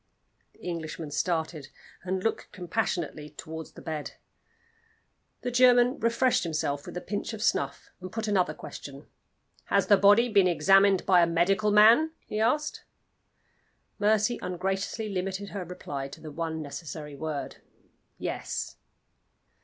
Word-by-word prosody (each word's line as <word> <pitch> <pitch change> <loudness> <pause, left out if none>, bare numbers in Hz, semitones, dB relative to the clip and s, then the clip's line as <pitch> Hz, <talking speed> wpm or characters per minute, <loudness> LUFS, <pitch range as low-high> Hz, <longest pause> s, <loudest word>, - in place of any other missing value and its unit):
The - - -25
Englishman 165 -3 -5
started, 160 -2 -2 0.4
and 185 +1 -2
looked 225 - -2
compassionately 175 -5 -3
toward 160 +2 -8
the - - -14
bed. 155 -3 -5 1.3
The 250 - -3
German 245 +1 +5
refreshed 235 +2 +2
himself 150 -4 -2
with - - -6
a - - -4
pinch 205 +4 -4
of 215 -1 -5
snuff, - - -1
and 185 0 -7
put 225 -1 -3
another 180 -7 +1
question. 140 +1 -9 0.6
"Has - - +2
the 205 - +6
body 205 +5 +6
been 200 -5 +4
examined 195 +3 +4
by 180 -2 +5
a 170 - +4
medical 185 +5 +2
man?" 225 +10 +6
he 215 - -4
asked. 295 +7 0 1.2
Mercy 215 +3 +2
ungraciously 190 +4 -2
limited 195 0 -3
her 200 -3 -5
reply 145 -6 -6
to 140 - -12
the 155 - -9
one 160 0 -3
necessary 150 0 -7
word 150 0 -5 0.6
"Yes." - - -4
185 Hz, 135 wpm, -28 LUFS, 160-215 Hz, 1.3 s, the